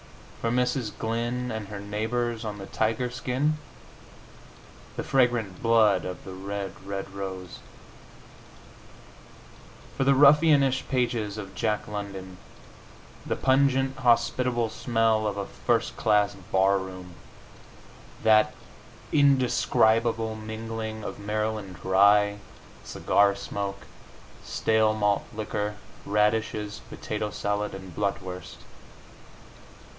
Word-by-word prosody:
For 115 - 0
Mrs. 125 -2 0
Glyn 120 +2 -2
and 110 -2 -4
her 100 0 -7
neighbors 110 +3 -2
on 105 -2 -4
the 100 - -7
tiger 115 +4 -1
skin, 140 +5 -1 1.4
the - - -3
fragrant 120 -8 +1
blood 110 -5 +4
of 90 0 -7
the 95 - -7
red, 100 +1 -5
red 100 0 -5
rose. 95 -2 -6 2.4
For - - 0
the 135 0 +4
ruffianish 140 -1 +5
pages 120 -5 -1
of 100 -2 -7
Jack 105 -1 -1
London, 100 -3 -6 0.9
the - - -2
pungent, 135 0 +2
hospitable 120 -1 +2
smell 115 -2 +1
of 100 -1 -3
a 100 - -2
first - - -1
class 105 -1 +2
bar 95 0 +1
room 95 -1 -8 1.1
that 110 -1 +4 0.6
indescribable 115 -5 +3
mingling 110 0 -5
of - - -6
Maryland 105 -2 -3
rye, 100 +2 +4 0.4
cigar 100 -1 +2
smoke, 100 0 -5 0.6
stale 110 -1 +2
malt 105 -1 +1
liquor, 105 -1 -3 0.3
radishes, 105 0 0
potato 105 0 -4
salad 105 0 -2
and 95 -3 -10
blutwurst. 95 -3 -4
110 Hz, 100 wpm, -26 LUFS, 100-120 Hz, 2.4 s, ruffianish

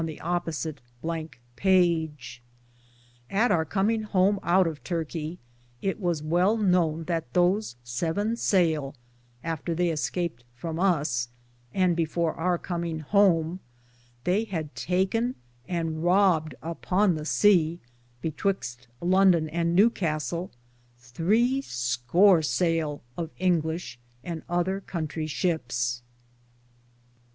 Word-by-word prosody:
II 160 -2 -4
^ 160 -1 -1 0.9
[At 220 +5 +2
our 160 - +3
cominge 215 +6 +1
home 200 0 +2
out 180 +2 +4
of 160 -3 -4
Turkic 165 -1 -3 0.4
it 195 - -2
was 170 -6 -1
well 180 +7 +2
knowne 175 -6 +2
that 165 -7 -2
those 180 - +2
seven 165 - -1
saile, 160 -10 +1 0.5
after 165 0 -3
they 175 0 +1
escaped 160 -4 -2
from 160 +5 -5
us, 145 -10 +1 0.4
and 180 0 +2
before 165 0 0
our 175 +1 0
coming 170 -2 -3
home, 175 -1 +3 0.6
they 195 - +1
had 160 - -4
taken 190 - 0 0.3
and 165 -2 -2
Robed 175 -5 +3
upon 180 +4 +1
the 155 - -4
seae, 170 0 +3 0.5
betwyxt 150 -7 -2
London 180 -2 +4
and 170 +1 0
New 215 +6 +6
Castell, 165 - -2 0.5
thre 205 - +1
score 125 - +3
sayle 155 +1 0
of 165 -2 -4
Inglishe 170 -5 0 0.3
and 165 -2 -5
other 180 +3 0
contrie 155 -2 -4
ships. 120 -8 -1
170 Hz, 110 wpm, -27 LUFS, 155-185 Hz, 0.9 s, New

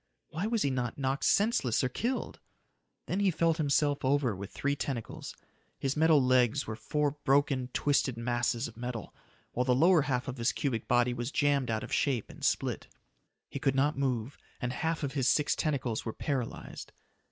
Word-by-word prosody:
Why 175 +7 -2
was 225 -1 +1
he 140 - +1
not 125 -3 -2
knocked 135 0 -1
senseless 200 - +2
or - - +3
killed? 240 - -3 0.7
Then 190 - -2
he 200 -1 +3
felt 165 -1 +1
himself 145 -2 +1
over 135 -4 +2
with 100 +1 -7
three 140 0 -1
tentacles. 130 -5 -5 0.4
His 135 0 -1
metal 160 -1 +5
legs 130 0 +3
were 110 - -4
four 145 +6 0
broken, 135 -2 +2
twisted 135 -4 +1
masses 120 +1 0
of 115 - -12
metal, 120 -1 -6 0.4
while 125 - 0
the 125 0 +2
lower 165 +4 +5
half 130 -2 -1
of 130 0 -4
his 115 0 +1
cubic 120 -6 -2
body 120 0 +3
was 120 +2 -4
jammed 145 -4 +1
out 110 -1 -1
of - - -6
shape 130 -7 0
and - - -14
split. - - 0 0.6
He 140 - -6
could 135 -1 +1
not 145 +3 +2
move, 130 -2 -2 0.2
and 125 0 -2
half 160 +3 -2
of 135 -1 -2
his 135 -3 0
six 150 +2 +2
tentacles 130 -7 -1
were 110 - -4
paralyzed. 135 -6 -4
135 Hz, 185 wpm, -30 LUFS, 120-145 Hz, 0.7 s, metal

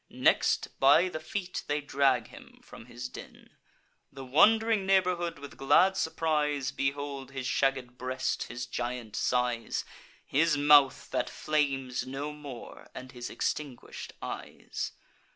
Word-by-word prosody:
Next, - - +1
by 145 +7 +6
the 155 - -5
feet, 180 +3 -4
they 150 0 0
drag 135 -5 +1
him - - -14
from 115 - -13
his 120 +1 -6
den. - - -12 0.6
The 135 -1 -9
wond'ring 220 - +4
neighbourhood, 180 -3 +2
with 145 0 -10
glad 185 +8 +4
surprise, 150 -5 0
Behold 140 -1 -3
his 135 -2 -5
shagged 130 -2 0
breast, 130 0 -2
his 120 +1 -5
giant 120 -3 -4
size, 125 -2 0 0.4
His 150 +2 +2
mouth 145 -2 +5
that - - 0
flames 135 -5 -1
no 140 +3 -4
more, 145 -5 -10
and 130 0 -8
his 120 -1 -6
extinguish'd 145 -5 -4
eyes. - - -5
140 Hz, 130 wpm, -29 LUFS, 130-155 Hz, 0.6 s, by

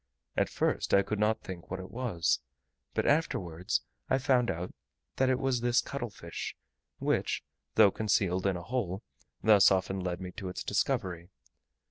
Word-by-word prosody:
At - - +2
first - - +1
I 100 - +5
could 105 +1 -3
not 105 +1 +2
think 90 -2 -8
what 95 - -3
it 95 0 -8
was, 110 -8 0 0.6
but - - +1
afterwards 90 - +1 0.3
I - - +4
found 130 -3 +3
out 85 +2 -3 0.4
that 130 0 +3
it 130 - +3
was 130 -2 0
this 120 0 +3
cuttle 130 -4 -3
fish, 85 -5 -6 0.4
which, - - 0 0.3
though 100 - +7
concealed 95 -3 +1
in 95 -2 +1
a 85 - -7
hole, 105 -3 -2 0.4
thus 105 -3 +7
often 95 0 +1
led 90 -1 -2
me 90 -1 -6
to 95 - -4
its 90 - -5
discovery. 85 -1 -1
95 Hz, 165 wpm, -31 LUFS, 90-120 Hz, 0.6 s, though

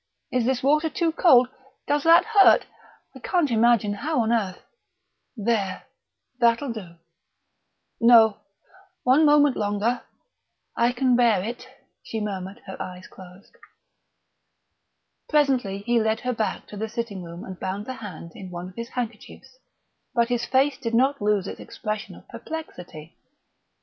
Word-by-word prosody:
is 250 -2 +1
this 255 0 0
water 300 +3 +3
too 335 +1 0
cold? 260 -7 +5 0.4
Does 290 0 +1
that 335 +1 +6
hurt? 430 -3 +5 0.5
I - - -10
can't 345 -8 0
imagine 225 -2 +3
how 285 +6 -1
on 225 0 0
earth... 195 -6 -2 0.7
there; 205 -3 -1 0.6
that'll 235 +2 +2
do 185 -7 -9 0.6
" - - -45
"No 220 -3 +6 0.7
one 270 +5 +4
moment 290 -2 +5
longer 210 +4 -1 0.7
I 235 +1 +2
can 250 0 +2
bear 230 -6 +3
it," 240 +4 -6 0.3
she 225 - -5
murmured, 200 0 -5
her 190 - -8
eyes 180 0 -7
closed.... 185 +2 -15 1.7
Presently 255 -10 +1
he 240 -1 +2
led 220 0 0
her 250 0 -1
back 220 -2 -3
to 210 - -9
the 220 +2 -3
sitting 215 -4 -5
room 170 +1 -9
and 190 -1 -9
bound 195 +2 -4
the 260 - -5
hand 185 -8 -9
in 190 - -9
one 180 +1 -7
of 185 - -17
his 235 0 -6
handkerchiefs; 240 - -7 0.6
but 235 0 +2
his 240 -1 -1
face 265 +2 +1
did 230 -2 -2
not 270 +2 +2
lose 205 -2 +1
its - - -7
expression 215 0 -6
of - - -17
perplexity. 180 - -9
230 Hz, 150 wpm, -24 LUFS, 200-260 Hz, 1.7 s, that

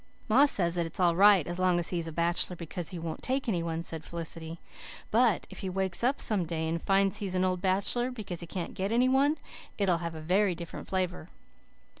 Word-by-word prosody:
"Ma 260 +6 +6
says 175 -10 +1
that 175 -1 0
it's 165 - -5
all 175 -2 +3
right 195 -3 +6
as 175 +1 -5
long 185 -1 +3
as 170 - +1
he 175 - -1
is 165 - -4
a - - -5
bachelor 170 +2 +1
because 170 0 -4
he 180 - -6
won't 165 -1 -5
take 265 +1 -1
any 180 -7 0
one," 165 0 -3
said 160 -2 -3
Felicity, 165 0 -5 0.5
"but 230 -3 +3
if - - -8
he 190 - -3
wakes 190 +1 -1
up 260 +4 +2
some 205 -5 0
day 160 -1 -3
and 165 +1 -2
finds 195 +1 +2
he 205 -2 -4
is 185 - -3
an 185 0 +2
old 185 -1 -1
bachelor 200 +6 +1
because 210 -8 -6
he 170 - -6
can't 175 -1 -5
get 195 +2 -2
any 245 +2 +3
one 275 +4 +3 0.4
it'll 185 -5 +2
have 170 -1 -5
a - - -6
very 185 +4 +1
different 170 0 -8
flavour." 180 -3 -2
180 Hz, 235 wpm, -29 LUFS, 170-205 Hz, 0.5 s, Ma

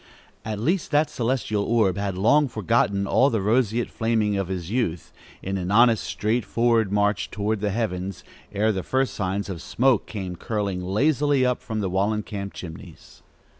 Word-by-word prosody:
At 110 0 -4
least, 170 - 0
that 150 0 +2
celestial 115 -5 -1
orb 110 -4 +2
had 100 -2 -3
long 145 +9 +4
forgotten 110 -3 +1
all 135 +7 +3
the 115 - 0
roseate 115 +3 +1
flaming 110 -2 0
of 95 -2 -1
his 90 -1 -5
youth, 100 -10 -2 0.3
in 95 0 -2
an 90 0 -3
honest, 115 +1 +4
straightforward 115 0 +1
march 105 0 +1
through 105 +1 -1
the 105 0 -1
heavens, 95 -4 -3 0.3
ere 105 +2 +1
the 95 -3 -2
first 130 +6 0
signs 100 0 -2
of 90 -4 -6
smoke 125 0 +1
came 95 -4 -5
curling 100 -5 -2
lazily 140 +7 +2
up 125 -1 0
from 110 -2 -4
the 100 - -1
Wallencamp 100 0 -1
chimneys. 90 +1 -11
105 Hz, 165 wpm, -24 LUFS, 95-120 Hz, 0.3 s, long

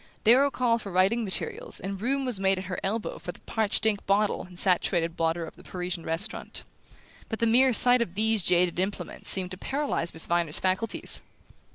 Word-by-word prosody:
Darrow 260 +6 +5
called 235 -4 0
for 200 - -8
writing 190 +6 +2
materials 195 -3 -1
and 195 0 -6
room 270 +3 -1
was 245 -6 0
made 195 0 +1
at 185 - -5
her 185 0 -5
elbow 215 +3 -3
for - - -6
the - - -15
parched 220 -1 -1
ink 210 -2 +1
bottle 205 +1 +1
and 180 -1 -15
saturated 175 -2 +2
blotter 165 +1 -1
of - - -12
the - - -17
Parisian 180 -1 -5
restaurant; 165 +6 -4 0.7
but 220 - -3
the 230 - 0
mere 255 +3 +4
sight 245 +2 +7
of 185 -6 -3
these 220 -1 +2
jaded 180 0 +1
implements 195 +2 -4
seemed 185 -1 -1
to 185 - -7
paralyze 275 - -2
Miss 160 - +2
Viner's 170 -3 +1
faculties. 190 +4 +1
195 Hz, 195 wpm, -26 LUFS, 180-230 Hz, 0.7 s, sight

